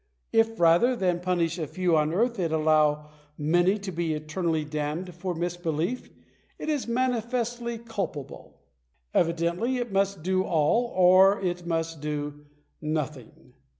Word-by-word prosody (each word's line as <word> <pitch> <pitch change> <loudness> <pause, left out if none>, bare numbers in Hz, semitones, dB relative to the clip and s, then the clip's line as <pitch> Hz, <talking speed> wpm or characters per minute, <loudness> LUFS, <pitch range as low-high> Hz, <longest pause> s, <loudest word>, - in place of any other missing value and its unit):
If, 225 0 +2
rather 175 +10 +5
than 180 -5 0
punish 175 -1 0
a 155 - -2
few 180 +1 +1
on 155 0 +2
earth, 230 +5 0
it 170 -3 0
allows 155 -1 +3 0.3
many 175 +6 +2
to 200 -2 -6
be 165 -2 -1
eternally 155 +1 -2
damned 155 +4 -3
for 175 +1 -4
misbelief, 175 +5 -2 0.5
it - - -5
is 295 -5 -1
manifestly 240 -1 -1
culpable. 195 - -6 0.5
Evidently 170 +9 +1
it 240 -3 -3
must 195 -3 0
do 185 +1 +1
all, 170 +8 +2
or 185 +2 +6
it 175 -2 -3
must 165 -2 -2
do 150 -1 -4 0.4
nothing. 150 -5 -5
175 Hz, 135 wpm, -27 LUFS, 155-200 Hz, 0.5 s, or